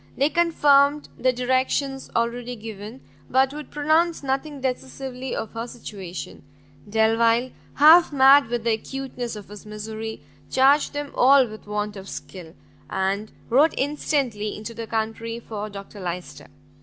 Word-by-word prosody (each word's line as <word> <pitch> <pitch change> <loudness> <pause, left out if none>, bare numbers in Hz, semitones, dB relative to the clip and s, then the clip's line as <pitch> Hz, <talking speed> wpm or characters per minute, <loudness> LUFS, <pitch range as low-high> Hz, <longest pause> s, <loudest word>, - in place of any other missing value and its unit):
They 280 +3 +3
confirmed 295 -4 +3
the 255 - +2
directions 260 +2 -1
already 240 +1 -1
given, 220 +2 -9 0.3
but 265 +1 +3
would 300 -1 -8
pronounce 315 +3 +1
nothing 275 +2 -2
decisively 260 0 -4
of 220 - -4
her 230 +1 -5
situation. 195 -7 -8 0.5
Delvile, 230 +3 +2 0.2
half 320 +4 +7
mad 275 -1 +6
with 240 -1 -2
the 230 - +2
acuteness 250 0 -5
of 205 -2 -10
his 210 -1 -10
misery, 220 +1 -7 0.3
charged 275 +3 +4
them 290 -1 -4
all 270 +1 +6
with 215 -1 -11
want 210 0 -3
of 195 0 -9
skill, 175 -3 -9 0.3
and 195 +3 -1 0.2
wrote 290 +7 +4
instantly 270 -7 -1
into 215 +2 -7
the 230 0 -6
country 225 +1 -3
for 215 -2 -6
Dr 200 +1 -10
Lyster. 180 -1 -6
240 Hz, 140 wpm, -24 LUFS, 215-275 Hz, 0.5 s, half